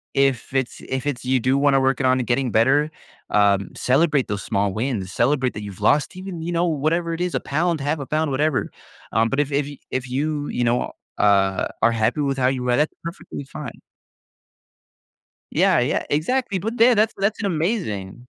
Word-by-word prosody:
if 135 -2 +1
it's 130 -2 -1
if 130 +2 -3
it's 125 -3 -3
you 130 0 +2
do 130 +3 +2
wanna 140 -1 +3
work 135 0 +1
it 130 - 0
on 130 0 +3
and 120 - -3
getting 125 -1 +1
better, 145 +7 +3 0.4
um, 100 -1 +3
celebrate 145 +1 +2
those 100 -2 -3
small 100 -2 0
wins, 110 -4 -2
celebrate 130 +2 +1
that 105 - -5
you've 100 -1 -9
lost 145 - +2
even, 185 -3 -6
you 175 - -3
know, 170 +1 +1
whatever 165 +2 0
it 175 - -6
is, 180 -1 -1
a - - +1
pound, 160 +1 -1
1/2 145 +3 0
a 140 - -5
pound, 155 +1 0
whatever, 145 +1 0 0.4
um, 110 +1 +3
but 135 - -1
if 145 0 0
if 140 0 +1 0.2
if 130 0 -3
you, 145 +3 -2
you 120 - -1
know, 120 +1 +1 0.3
uh, 95 -2 +3 0.2
are 115 +1 +5
happy 115 +6 0
with 135 -1 0
how 125 - +1
you 125 -1 -1
are, 120 - +4
that's 150 +1 +1
perfectly 170 -4 -7
fine. 135 - -9 1.7
Yeah, - - +4
yea - - 0
exactly, 200 - 0
but, 225 +6 -4
the 240 +1 +6
that's 215 +1 +2
that's 205 +3 0
amazing! 155 - -2
135 Hz, 195 wpm, -22 LUFS, 120-155 Hz, 1.7 s, the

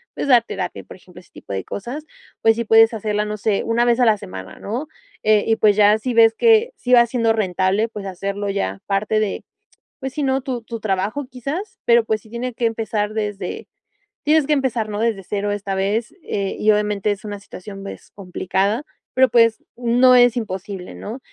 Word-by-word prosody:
pues - - -3
dar 245 -4 +6
terapia, 185 -5 -5
por - - -13
ejemplo, 180 -1 -16
ese - - -26
tipo - - -9
de 95 -1 -3
cosas, 250 - -6 0.4
pues 225 0 +4
si 235 - -2
puedes 225 +1 +6
hacerla, 210 -1 -1
no 210 0 -4
sé, 205 -1 0
una 235 +1 +1
vez 240 -1 +3
a 245 - +5
la 215 -2 +4
semana 95 - -9
¿no? 245 +9 -4 0.4
Eh, 215 -1 +3
y 225 - +3
pues, 210 -2 +4
ya 210 0 +6
si 250 +2 -3
ves 225 -1 +6
que 460 - +4
sí 250 - -5
va 240 -1 +8
siendo 230 -1 +1
rentable, 195 +1 +1
pues 205 -3 -8
hacerlo 200 +2 -4
ya 100 - -2
parte 205 +2 +1
de, 210 -2 -3 0.6
pues 265 -1 -5
si 300 - -2
¿no? 265 0 +1
Tu 255 -3 -4
tu 230 0 -7
trabajo 210 +7 -2
quizás, 290 - -5
pero 235 -1 +4
pues 220 -2 -1
sí 220 - -18
tiene 240 +1 -4
que 235 - 0
empezar 220 -2 -2
desde, 210 -2 -4 0.6
tienes 305 -1 +3
que 300 - +3
empezar 255 -5 0
¿no? 205 - -4
Desde 225 -4 0
0 205 +2 -2
esta 200 -1 -3
vez, 205 +4 -1
eh, 195 -1 -3
y 215 - +4
obviamente 210 -1 0
es 205 +1 -5
una 205 -1 -5
situación, 195 0 -10
pues 200 - -10
complicada, 195 +5 -1 0.3
pero 260 0 +6
pues 230 -1 +4
no 245 +1 +4
es 245 0 +5
imposible, 195 -3 -5
¿no? 225 +6 -7
220 Hz, 205 wpm, -20 LUFS, 200-240 Hz, 0.6 s, va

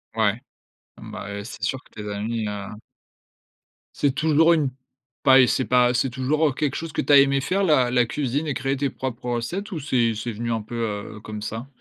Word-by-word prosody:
ouais, 110 +1 +2 0.6
bah, 100 - -8
heu, 100 0 -5
c'est 115 - -10
sûr 130 - -1
que - - -24
tes 105 - -6
amis, 110 +2 -2
heu - - -2 1.4
c'est 145 -2 +1
toujours 160 +2 +4
une 150 -5 +1 0.5
pas 135 0 +7
et 125 - +5
c'est 130 - +1
pas 125 0 +4
c'est 130 +1 +1
toujours, 140 +5 +1
heu, - - +1
quelque 145 -1 -1
chose 165 -2 -5
que - - 0
tu - - -1
as - - +10
aimé 140 0 +4
faire, 195 +7 0
la 130 -8 +3
la 125 -1 +3
cuisine 145 +4 -2
et 145 - 0
créer 135 +1 -1
tes 140 0 0
propres 125 -2 -5
recettes 175 - -3
ou 165 - -3
c'est 120 -5 +1
c'est 115 +2 -4
venu 115 +2 -4
un 115 -1 -1
peu, 115 +3 -9 0.4
heu, - - -9
comme 105 -1 -7
ça? 115 +4 -5
130 Hz, 220 wpm, -23 LUFS, 115-145 Hz, 1.4 s, as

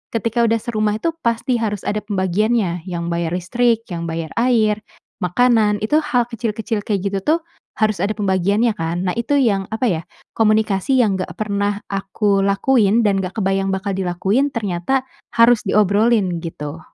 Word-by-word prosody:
Ketika 230 +1 +1
udah 230 0 +2
serumah 215 -3 0
itu 335 - 0
pasti 235 -1 0
harus 210 -3 -2
ada 210 - -1
pembagiannya 195 -2 -1
yang 170 -1 -3
bayar 170 0 -1
listrik, 230 +5 +1
yang 170 -1 -4
bayar 165 -1 -4
air, 225 -4 +2 0.4
makanan, 210 +2 +2
itu 295 +8 +3
hal 275 -6 +1
kecil-kecil 220 -1 -2
kayak 200 -2 -2
gitu 195 - -1
tuh 310 - +2 0.4
harus 215 -2 +1
ada 210 +2 -1
pembagiannya 200 +3 +1
kan. 170 +1 -2
Nah, - - +1
itu 235 +5 0
yang, 200 -7 +1
apa 225 +3 -1
ya, 165 -6 0 0.3
komunikasi 215 +2 +2
yang 205 -6 +2
enggak 185 - -4
pernah 205 -1 -2
aku 195 +1 0
lakuin 210 +2 +3
dan 200 -2 +2
enggak 185 0 -5
kebayang 195 -1 0
bakal 190 +1 -2
dilakuin, 190 +8 0
ternyata 225 +3 -1 0.3
harus 230 0 +6
diobrolin, 205 -2 +2
gitu. 150 -1 -6
210 Hz, 160 wpm, -19 LUFS, 190-230 Hz, 0.4 s, harus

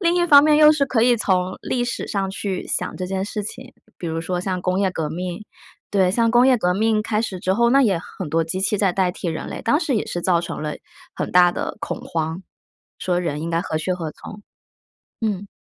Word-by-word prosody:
另 340 -2 +2
一 345 - +2
方 290 -3 +8
面 300 -1 +5
又 305 0 +8
是 300 -2 +2
可 245 -3 0
以 240 0 +4
从 185 -3 0
历 245 - -1
史 245 - -3
上 195 -2 -2
去 195 -1 -4
想 180 - -2
这 185 - -4
件 190 +1 -2
事 210 0 -4
情， 205 - -9 0.2
比 175 - -6
如 165 0 -2
说 180 +2 -2
像 185 -1 -2
工 185 +1 0
业 190 -2 +2
革 160 -4 -3
命。 180 +4 -5 0.5
对， 190 -3 +3
像 230 +3 +2
工 240 +2 +5
业 260 -1 +5
革 180 -4 +1
命 220 +1 +2
开 215 0 -1
始 190 -5 -4
之 185 +1 0
后， 235 +4 +3
那 275 +2 +5
也 205 -8 +3
很 180 -1 -8
多 165 +2 +1
机 185 +4 -4
器 205 +2 +1
在 195 -2 +2
代 185 -1 +1
替 175 - -5
人 160 - -4
类， - - -6
当 290 +6 +2
时 310 -6 -1
也 215 - 0
是 175 - -4
造 175 -1 +2
成 170 -2 -6
了 150 -1 -3 0.4
很 - - -3
大 175 -1 +5
的 - - -4
恐 - - -5
慌， 160 +2 -3 0.6
说 180 -1 0
人 150 -4 -3
应 165 - -4
该 165 0 0
何 155 - -3
去 185 +4 -1
何 165 -4 -4
从， 205 +6 -11 0.8
嗯。 205 -3 -2
190 Hz, 260 characters per minute, -22 LUFS, 175-225 Hz, 0.8 s, 方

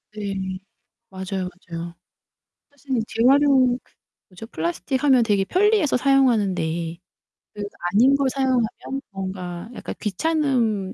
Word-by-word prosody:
네 200 -2 -3 0.8
맞아요, 190 -1 -4 0.2
맞아요. 170 +1 -5 0.7
사실 270 -4 -3
재활용 260 +1 +4 0.5
뭐죠? 210 +5 -10
플라스틱 175 - -2
하면 260 -4 +5
되게 200 -3 +1
편리해서 410 - +3
사용하는데 195 - +1 0.6
그래도 205 -1 -5 0.2
아닌 255 +7 +5
걸 275 -1 +1
사용하면 265 0 -1
뭔가 185 0 -6
약간 - - -6
귀찮은 230 - 0
225 Hz, 265 characters per minute, -23 LUFS, 190-270 Hz, 0.8 s, 하면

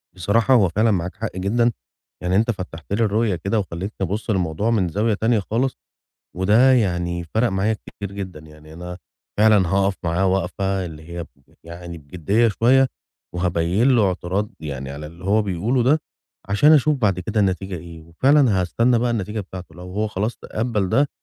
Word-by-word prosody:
بصراحة 100 +8 +2
هو 100 -8 +5
فعلًا 110 +5 +2
معاك 90 -2 -2
حق 105 -1 -5
جدًا، 115 +5 +2 0.5
يعني 90 +1 0
أنت 115 +3 +3
فتّحت 95 -3 -7
لي 115 - +2
الرؤية 105 -1 +1
كده 100 +5 -1
وخلّيتني 95 +2 -5
أبُص 105 +5 -4
للموضوع 95 +1 0
من 95 -6 +2
زاوية 105 +6 +1
تانية 110 +2 +1
خالص، 120 +6 -1 0.6
وده 110 +8 +5
يعني 90 -6 0
فَرق 120 +2 +3
معايا 95 +3 0
كتير 100 -1 -9
جدًا، 95 -5 -6
يعني 75 0 -15
أنا 90 +2 -8 0.4
فعلًا 105 -4 +5
هاقف 100 +1 +2
معاه 85 +3 +1
واقفة 95 +1 0
اللي 80 -1 -9
هي 85 0 -5
ب - - -21
ب 70 - -28
يعني 85 0 -8
بجِديّة 90 +10 +1
شوية 130 +6 +4 0.5
وهابيّن 90 +6 +1
له 105 -4 +4
اعتراض 95 +3 -2
يعني 70 -3 -5
على 75 +2 -7
اللي 85 +3 -13
هو 105 +2 +3
بيقوله 105 +7 0
ده، 145 +6 +3 0.5
عشان 145 +10 +5
أشوف 150 0 +4
بعد 95 -6 +1
كده 105 +4 -1
النتيجة 95 -1 -1
إيه 85 0 -10
وفعلًا 110 - +3
هاستنى 115 +6 +2
بقى 120 +1 0
النتيجة 105 -1 -2
بتاعته، 90 -4 -9
لو 90 - -11
هو 105 +2 0
خلاص 105 +3 -2
تقبّل 110 -4 -2
ده، 140 +9 +2
95 Hz, 180 wpm, -22 LUFS, 85-110 Hz, 0.6 s, هو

